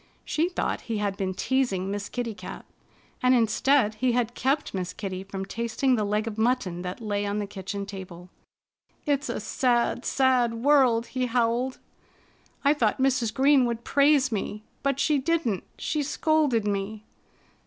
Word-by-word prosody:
She 325 Hz, +3 st, 0 dB
thought 365 Hz, -, -2 dB
he 225 Hz, -, 0 dB
had 205 Hz, -1 st, -1 dB
been 190 Hz, -1 st, -3 dB
teasing 200 Hz, -9 st, 0 dB
Miss 205 Hz, 0 st, -4 dB
Kitty 240 Hz, -2 st, -3 dB
Cat. 185 Hz, -1 st, -9 dB, 0.6 s
And 255 Hz, 0 st, +5 dB
instead 230 Hz, +1 st, +3 dB
he 245 Hz, +3 st, 0 dB
had 240 Hz, -1 st, 0 dB
kept 275 Hz, +4 st, 0 dB
Miss 185 Hz, -2 st, -3 dB
Kitty 190 Hz, -1 st, -5 dB
from 195 Hz, 0 st, -6 dB
tasting 235 Hz, +5 st, 0 dB
the 215 Hz, -, 0 dB
leg 210 Hz, +1 st, 0 dB
of 220 Hz, -1 st, -5 dB
mutton 220 Hz, -7 st, 0 dB
that 180 Hz, +6 st, -6 dB
lay 205 Hz, -1 st, -1 dB
on 205 Hz, 0 st, -2 dB
the 210 Hz, -, -1 dB
kitchen 200 Hz, 0 st, -5 dB
table. 185 Hz, -3 st, -9 dB, 0.8 s
"It's 285 Hz, 0 st, 0 dB
a -, -, -2 dB
sad, 245 Hz, -2 st, +1 dB
sad 255 Hz, -3 st, +2 dB
world!" 245 Hz, -2 st, +4 dB
he 255 Hz, -1 st, 0 dB
howled. 245 Hz, +2 st, 0 dB, 0.9 s
"I 285 Hz, -, +6 dB
thought 230 Hz, -8 st, +1 dB
Mrs. 260 Hz, -4 st, +1 dB
Green 270 Hz, +3 st, +4 dB
would 235 Hz, -1 st, -3 dB
praise 280 Hz, -1 st, +3 dB
me. 210 Hz, 0 st, -3 dB, 0.2 s
But 275 Hz, -1 st, 0 dB
she 300 Hz, -2 st, +2 dB
didn't. 275 Hz, -, 0 dB
She 305 Hz, -, -1 dB
scolded 295 Hz, -5 st, +1 dB
me!" 205 Hz, +1 st, -2 dB
230 Hz, 165 wpm, -26 LUFS, 205-265 Hz, 0.9 s, I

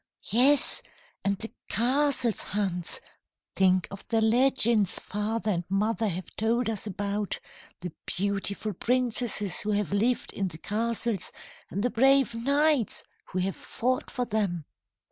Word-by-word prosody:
"Yes, 265 Hz, +5 st, +6 dB, 0.4 s
and 200 Hz, 0 st, 0 dB
the 225 Hz, +3 st, -6 dB, 0.2 s
castles, 250 Hz, 0 st, +1 dB
Hans! 185 Hz, -4 st, -3 dB, 0.5 s
Think 185 Hz, -1 st, +3 dB
of 195 Hz, -, -8 dB
the 225 Hz, -, +1 dB
legends 230 Hz, -3 st, +3 dB
father 210 Hz, +1 st, -2 dB
and 175 Hz, -2 st, -1 dB
mother 215 Hz, +3 st, +1 dB
have 185 Hz, -1 st, -5 dB
told 225 Hz, +2 st, +1 dB
us 215 Hz, -1 st, -5 dB
about 205 Hz, +1 st, -2 dB, 0.4 s
the 180 Hz, -1 st, -5 dB, 0.2 s
beautiful 200 Hz, +2 st, -1 dB
princesses 235 Hz, -2 st, +1 dB
who 210 Hz, 0 st, 0 dB
have 205 Hz, -2 st, -1 dB
lived 230 Hz, +5 st, 0 dB
in 195 Hz, -, -1 dB
the 165 Hz, -3 st, -8 dB
castles, 225 Hz, +1 st, -1 dB, 0.4 s
and 200 Hz, -, -3 dB
the 245 Hz, -, +1 dB
brave 270 Hz, +1 st, +4 dB
knights 280 Hz, +1 st, +1 dB, 0.2 s
who 185 Hz, -, -6 dB
have 190 Hz, +1 st, -1 dB
fought 255 Hz, +2 st, -2 dB
for 250 Hz, -, -2 dB
them! 195 Hz, -8 st, -1 dB
215 Hz, 135 wpm, -27 LUFS, 200-240 Hz, 0.5 s, Yes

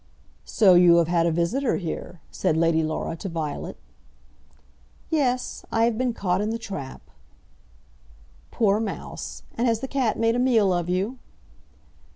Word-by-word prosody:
"So 200 Hz, -5 st, +4 dB
you 175 Hz, -1 st, +7 dB
have 170 Hz, -1 st, +3 dB
had 170 Hz, -1 st, +2 dB
a -, -, +2 dB
visitor 195 Hz, -, 0 dB
here," 175 Hz, -1 st, -6 dB
said 160 Hz, -, 0 dB
Lady 165 Hz, 0 st, +3 dB
Laura 155 Hz, +1 st, -3 dB
to 195 Hz, -, -5 dB
Violet. 160 Hz, -3 st, -4 dB, 1.3 s
"Yes; 255 Hz, -5 st, 0 dB
I 225 Hz, -, +2 dB
have 230 Hz, -1 st, +2 dB
been 250 Hz, +2 st, 0 dB
caught 190 Hz, -4 st, -1 dB
in 210 Hz, -, -1 dB
the 225 Hz, -, -2 dB
trap." 195 Hz, -12 st, -7 dB, 1.5 s
"Poor 210 Hz, -3 st, +2 dB
mouse! 220 Hz, -3 st, -6 dB
And 240 Hz, +2 st, 0 dB
has 225 Hz, -2 st, +1 dB
the 265 Hz, -, -5 dB
cat 260 Hz, -5 st, 0 dB
made 230 Hz, 0 st, +2 dB
a -, -, 0 dB
meal 225 Hz, -7 st, +3 dB
of 175 Hz, -1 st, -2 dB
you?" 200 Hz, +8 st, -1 dB
200 Hz, 155 wpm, -24 LUFS, 170-230 Hz, 1.5 s, you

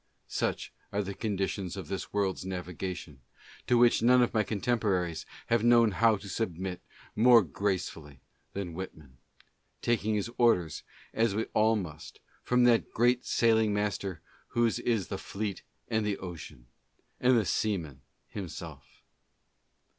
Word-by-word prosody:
Such -, -, -2 dB, 0.2 s
are 100 Hz, 0 st, 0 dB
the 100 Hz, +1 st, -5 dB
conditions 95 Hz, -3 st, -2 dB
of 95 Hz, -5 st, -6 dB
this 95 Hz, +2 st, -5 dB
world's 100 Hz, -3 st, -1 dB
navigation, 90 Hz, -5 st, -5 dB, 0.5 s
to 125 Hz, -, +4 dB
which 120 Hz, -1 st, +5 dB
none 125 Hz, +2 st, +6 dB
of 120 Hz, -, -1 dB
my 110 Hz, -, +3 dB
contemporaries 100 Hz, -6 st, -1 dB, 0.2 s
have 115 Hz, -1 st, +1 dB
known 120 Hz, -2 st, +5 dB
how 115 Hz, +2 st, +4 dB
to 100 Hz, 0 st, -9 dB
submit 95 Hz, -3 st, -3 dB, 0.3 s
more 120 Hz, 0 st, +7 dB
gracefully 85 Hz, -5 st, -3 dB, 0.3 s
than 95 Hz, -4 st, -4 dB
Whitman, 80 Hz, -7 st, -9 dB, 0.3 s
— -, -, -45 dB
taking 110 Hz, -2 st, +1 dB
his 105 Hz, 0 st, -1 dB
orders, 90 Hz, -10 st, +3 dB, 0.3 s
as 110 Hz, -3 st, +1 dB
we 110 Hz, -, 0 dB
all 110 Hz, +1 st, +4 dB
must, 80 Hz, -7 st, -6 dB, 0.2 s
from 125 Hz, 0 st, +2 dB
that 120 Hz, -2 st, +4 dB
great 120 Hz, +2 st, +2 dB
sailing 110 Hz, -2 st, +3 dB
master 100 Hz, -4 st, -2 dB, 0.3 s
whose 120 Hz, -1 st, +1 dB
is 110 Hz, -7 st, 0 dB
the 95 Hz, -, -4 dB
fleet 100 Hz, 0 st, -4 dB, 0.3 s
and 110 Hz, -1 st, 0 dB
the 105 Hz, -1 st, -1 dB
ocean, 85 Hz, -9 st, -9 dB, 0.5 s
and 125 Hz, 0 st, +4 dB
the 110 Hz, -, +2 dB
seaman 85 Hz, -8 st, -1 dB, 0.3 s
himself. 95 Hz, -6 st, -9 dB
100 Hz, 140 wpm, -30 LUFS, 90-115 Hz, 0.5 s, more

